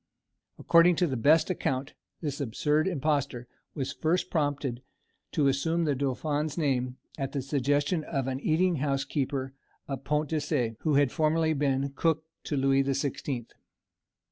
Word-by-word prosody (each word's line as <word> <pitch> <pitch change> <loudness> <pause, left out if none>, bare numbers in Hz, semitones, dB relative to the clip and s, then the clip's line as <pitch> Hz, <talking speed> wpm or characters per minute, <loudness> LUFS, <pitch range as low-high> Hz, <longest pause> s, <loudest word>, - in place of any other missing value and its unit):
According 170 +1 +5
to 180 - +2
the 135 -6 -1
best 155 +9 +4
account, 135 -5 -2 0.3
this 145 -3 -3
absurd 150 +6 +1
impostor 140 -7 -1 0.3
was 135 -3 -3
first 175 +3 0
prompted 145 -6 -1 0.5
to 145 - +3
assume 160 +5 +1
the 150 -3 +2
dauphin's 145 +3 -1
name 130 -5 0 0.2
at 135 -1 -3
the 140 - -1
suggestion 145 +4 +1
of 135 -5 -2
an 130 0 -2
eating 170 +4 +2
house 135 -1 0
keeper 135 -1 -2 0.3
of 135 -1 -5
Pont 150 0 0
de 160 - 0
Cé, 125 -7 -1
who 155 -3 +1
had 140 -2 +4
formerly 160 0 +2
been 140 -1 0
cook 160 +2 +1 0.2
to 145 - -2
Louis 135 0 +3
the 135 0 0
Sixteenth. 135 -3 -3
145 Hz, 155 wpm, -28 LUFS, 135-155 Hz, 0.5 s, According